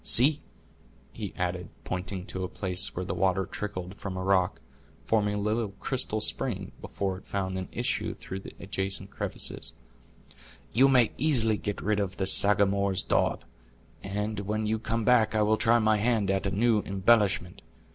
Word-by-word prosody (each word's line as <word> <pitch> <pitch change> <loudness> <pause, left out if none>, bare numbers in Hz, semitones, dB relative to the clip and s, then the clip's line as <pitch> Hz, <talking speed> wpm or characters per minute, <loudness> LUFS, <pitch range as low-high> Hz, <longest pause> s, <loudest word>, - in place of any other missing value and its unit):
See," 140 +5 +5 0.7
he - - -5
added, 90 0 -3
pointing 90 0 -4
to 95 -2 -4
a - - -1
place 95 -1 -1
where 90 - -3
the - - -3
water 95 +1 +1
trickled 95 -2 -6
from 95 -2 -5
a 95 - -3
rock, 95 -1 +2 0.4
forming 105 -2 +1
a - - -2
little 105 0 -1
crystal 125 -5 -1
spring, 105 -5 0
before 95 -2 -3
it - - -23
found 95 -1 -2
an 95 -1 -5
issue - - -2
through 95 - -7
the - - -11
adjacent 95 0 -3
crevices; - - -4 1.0
"you 135 +4 +5
may 125 -4 +4
easily 120 -7 +3
get 105 0 -4
rid 105 0 0
of 100 -1 -3
the 95 - -1
Sagamore's 100 -1 +4
daub, - - 0 0.6
and 105 +2 -3
when 105 +2 -2
you 110 +1 0
come 115 0 -2
back 115 -3 +4
I 105 - +3
will 110 +1 +2
try 115 +2 +4
my 110 -1 +3
hand 105 -3 +1
at 95 0 0
a - - +1
new 110 +3 +2
embellishment. 100 -2 +1
100 Hz, 170 wpm, -28 LUFS, 95-110 Hz, 1.0 s, See